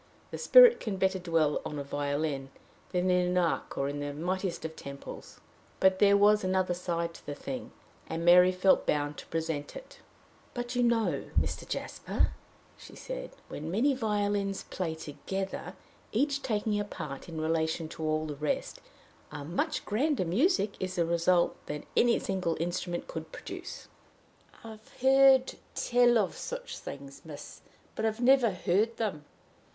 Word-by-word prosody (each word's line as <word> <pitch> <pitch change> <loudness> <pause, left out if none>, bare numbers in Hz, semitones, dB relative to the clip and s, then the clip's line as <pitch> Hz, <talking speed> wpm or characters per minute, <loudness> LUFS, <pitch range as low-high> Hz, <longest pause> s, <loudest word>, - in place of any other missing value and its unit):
The - - -5
Spirit - - +8
can 210 -5 -3
better 190 0 +1
dwell 165 -4 +1
in 150 - -5
a 140 - -3
violin 145 0 -2 0.4
than 180 0 +1
in 180 0 +3
an 180 0 0
ark 175 -2 0
or 140 - 0
in 145 +1 -4
the 145 0 -4
mightiest 180 +2 -2
of 160 0 -5
temples. 140 0 -9 0.4
But 190 0 +4
there 200 -1 +6
was 210 +1 +5
another 185 -1 +1
side 170 -1 -2
to - - -14
the 145 - -4
thing, 255 - -6 0.4
and 165 +1 -3
Mary 180 +1 +7
felt 185 +1 +3
bound 145 0 0
to - - -10
present 160 -3 -3
it. - - -11 0.6
"But, 245 0 -4
you 245 - +2
know, 235 -2 +1
Mr. - - -3
Jasper," - - -1 0.5
she - - -12
said, - - -7
"when 155 +2 -6
many 240 +11 +2
violins 205 -4 -1
play 165 -4 -3
together, 180 +5 -5 0.4
each 280 +5 +1
taking 210 -3 0
a - - 0
part 155 -7 -7
in 160 -1 -5
relation 160 +1 0
to 165 - -9
all 155 0 0
the 150 -1 -5
rest, 150 +1 -2 0.5
a 145 -2 -6
much 170 +4 -2
grander 260 - +1
music 220 - +2
is 185 0 -3
the 170 -2 +2
result 170 +1 +2
than 150 0 -5
any 240 0 +4
single 185 -4 -2
instrument 175 +1 -2
could 160 -1 -7
produce." - - -8 0.8
"I've 220 -1 -11
heard 265 0 +5 0.2
tell 240 -1 +4
of 205 -4 0
such - - -6
things, 140 0 -9
miss, 150 -3 -10 0.3
but - - -4
I've 220 +1 0
never 250 -1 +5
heard 200 +4 0
them." 185 -10 -3
185 Hz, 160 wpm, -30 LUFS, 160-220 Hz, 0.8 s, Spirit